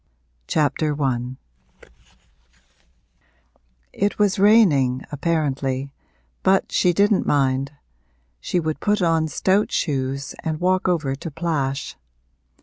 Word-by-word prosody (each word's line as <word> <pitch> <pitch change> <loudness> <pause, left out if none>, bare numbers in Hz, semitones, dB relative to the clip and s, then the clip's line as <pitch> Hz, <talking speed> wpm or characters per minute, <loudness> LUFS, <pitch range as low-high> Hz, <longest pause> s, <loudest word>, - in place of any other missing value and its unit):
A 150 -3 +3
LONDON 150 -2 0
LIFE 130 -3 -2 0.5
I - - -18 2.1
It 205 +1 -1
was 205 -2 +1
raining, 155 - +4
apparently, 140 -3 -2 0.5
but 190 0 +2
she 180 - +3
didn't 200 +3 +2
mind 135 0 +1 0.7
she 180 - -1
would 155 -2 -3
put 210 -2 +1
on 165 -2 +2
stout 190 +7 +1
shoes 140 -2 -2
and 155 -1 -3
walk 185 +1 +1
over 160 -7 0
to 155 +5 -7
Plash. 145 -4 -3
155 Hz, 110 wpm, -22 LUFS, 135-180 Hz, 2.1 s, raining